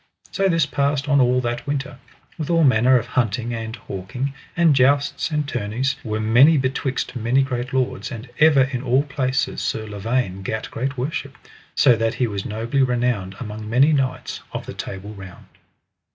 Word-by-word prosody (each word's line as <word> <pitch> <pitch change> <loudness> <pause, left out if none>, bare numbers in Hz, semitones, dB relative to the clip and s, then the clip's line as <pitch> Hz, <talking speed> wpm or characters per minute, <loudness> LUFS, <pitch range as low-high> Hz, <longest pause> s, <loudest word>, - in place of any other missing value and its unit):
So 195 -1 +1
this 165 -3 +3
passed 140 0 0
on 140 -2 +4
all 125 0 +3
that 120 +1 -3
winter, 140 -1 -3 0.4
with 155 - -3
all 165 -1 +3
manner 130 -1 +5
of 120 - -2
hunting 120 0 -1
and 110 0 -5
hawking, 115 +6 -5 0.2
and 165 -4 +5
jousts 140 +2 +2
and 150 -2 -1
tourneys 125 +2 -1
were 110 -2 -2
many 120 +9 +5
betwixt 130 0 -2
many 125 +3 +2
great 125 -2 -3
lords, 130 -1 -1
and 115 +2 -7
ever 150 -3 +6
in 130 -2 -3
all 130 +1 +2
places 135 -3 -1
Sir 110 - -2
Lavaine 105 -1 -2
gat 110 +3 -4
great 135 +3 -3
worship, 135 0 -4 0.4
so 125 -4 +5
that 115 0 -1
he 125 - +1
was 100 -3 -4
nobly 115 +6 -1
renowned 120 -7 0
among 105 -2 -6
many 135 +7 +4
knights 135 -3 -1
of - - -5
the - - -7
Table 100 +2 -7
Round. 95 -3 -11
125 Hz, 175 wpm, -22 LUFS, 110-140 Hz, 0.4 s, ever